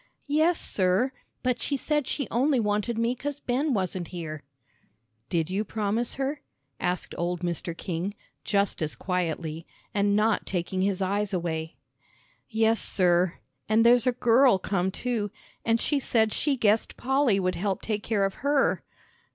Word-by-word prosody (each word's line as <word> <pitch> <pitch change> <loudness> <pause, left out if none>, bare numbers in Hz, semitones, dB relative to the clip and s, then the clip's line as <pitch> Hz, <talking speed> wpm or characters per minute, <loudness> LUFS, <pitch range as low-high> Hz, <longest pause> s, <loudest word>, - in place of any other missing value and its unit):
"Yes, 315 +4 +3
sir. 190 +7 +2 0.3
But 250 -2 0
she 280 - 0
said 295 0 0
she 280 -6 -1
only 260 +3 +2
wanted 210 +2 0
me 230 +1 +1
'cause 285 +3 -5
Ben 275 +4 0
wasn't 185 -5 -1
here." 160 -4 -6 0.9
"Did 170 0 0
you 200 +3 0
promise 220 +3 -2
her?" 275 +2 -2 0.4
asked 180 0 -2
old 175 0 -1
Mr. 170 -1 -3
King, 180 +4 -3 0.3
just 200 -3 +1
as 155 -1 -1
quietly, 165 -3 -3 0.3
and 200 0 +2
not 215 +1 +2
taking 185 +1 -2
his 195 0 +1
eyes 200 +1 0
away. 160 -2 -3 0.7
"Yes, 225 0 +2
sir; 180 -1 +2 0.3
and 220 +1 +4
there's 245 +1 +6
a - - +5
girl 245 -1 +4
come 190 -1 -1
too. 220 0 -2 0.3
And 230 0 +2
she 290 +3 +1
said 220 -4 +2
she 285 -3 +1
guessed 220 -1 +2
Polly 265 -5 +2
would 185 -1 0
help 195 +1 -2
take 210 -2 -1
care 205 -2 +1
of 195 - -1
her." 280 0 +2
210 Hz, 155 wpm, -27 LUFS, 180-245 Hz, 0.9 s, there's